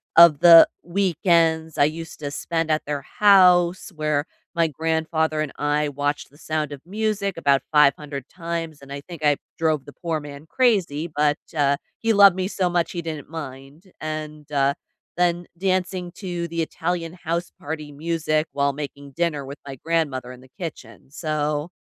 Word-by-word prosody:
of 170 -4 +8
the 170 -1 +10 0.2
weekends 170 -3 +1
I 145 - +6
used 165 +2 -5
to 145 -2 -4
spend 165 +3 -2
at 155 0 +1
their 145 -1 -3
house 185 +1 +4
where 150 -1 0 0.3
my 165 -1 +2
grandfather 160 0 -1
and 155 - -3
I 145 +1 0
watched 145 +1 -2
The 145 - -21
Sound 155 -1 -2
of 140 -2 -8
Music 200 -1 -2
about 140 -4 +2
500 145 -2 +2
times 165 -4 -5
and 140 0 -9
I 140 - -6
think 165 0 -7
I 145 -1 +4 0.2
drove 155 -4 0
the 145 - -12
poor 165 -2 -3
man 145 0 -10
crazy, 185 - +1
but, 150 -1 +2 0.2
uh, 140 -1 +3 0.2
he 225 0 +2
loved 200 -3 +7
me 185 0 -1
so 185 -3 0
much 175 -1 0
he 175 - -4
didn't 155 -3 -6
mind 145 +4 -9
and, 155 -1 -6
uh, 140 -1 +2 0.4
then 175 0 +1
dancing 185 -1 -1
to 175 -3 -4
the 165 0 -2
Italian 165 +1 -2
house 170 -1 -3
party 150 -1 -6
music 155 0 -1
while 140 0 +1
making 140 -1 -7
dinner 150 -2 -1
with 140 +2 -8
my 135 - -6
grandmother 145 -7 -1
in 125 - -11
the 130 - -17
kitchen, 120 - -8
so, 150 -1 -2
155 Hz, 170 wpm, -23 LUFS, 145-170 Hz, 0.4 s, the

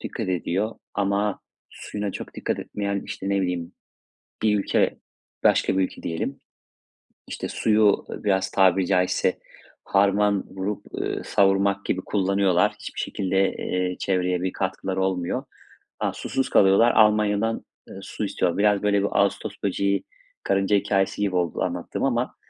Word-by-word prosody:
dikkat 110 -5 -5
ediyor 95 +4 -1 0.2
ama 100 0 0 0.3
suyuna 105 -2 -5
çok - - -8
dikkat - - -2
etmeyen, 100 -1 -3
işte, 95 - -5
ne 100 0 +1
bileyim 90 -2 -2 0.7
bir 105 -2 +3
ülke - - +1 0.4
Başka 95 - +3
bir 95 - +3
ülke - - -5
diyelim, 80 0 -3 0.9
işte, - - -5
suyu 105 -2 +2
biraz, 95 -2 -1
tabiri 95 -1 +3
caizse, 90 -1 +1 0.4
harman 100 0 +2
vurup, 95 +2 -4
ııı, - - -3
savurmak 100 0 +2
gibi 95 - -1
kullanıyorlar. 95 -2 +2
Hiçbir - - -7
şekilde, 95 0 0
eee, 90 0 -2
çevreye 90 -2 0
bir 95 - -1
katkıları 95 0 -2
olmuyor. 95 -2 -1 0.6
Ha, - - 0
susuz 135 - -2
kalıyorlar, 100 +5 +5
Almanya'dan, 105 0 +3 0.2
eee, - - -11
su - - -4
istiyorlar. 85 - -1
Biraz, 105 0 +3
böyle, 100 -1 +3
bir 100 - +1
"ağustos 100 0 0
böceği, 100 0 0 0.4
karınca" 95 +1 +2
hikâyesi 100 0 +1
gibi 95 -3 0
oldu 85 -2 0
anlattığım - - -3
ama - - 0
100 Hz, 140 wpm, -24 LUFS, 95-100 Hz, 0.9 s, kalıyorlar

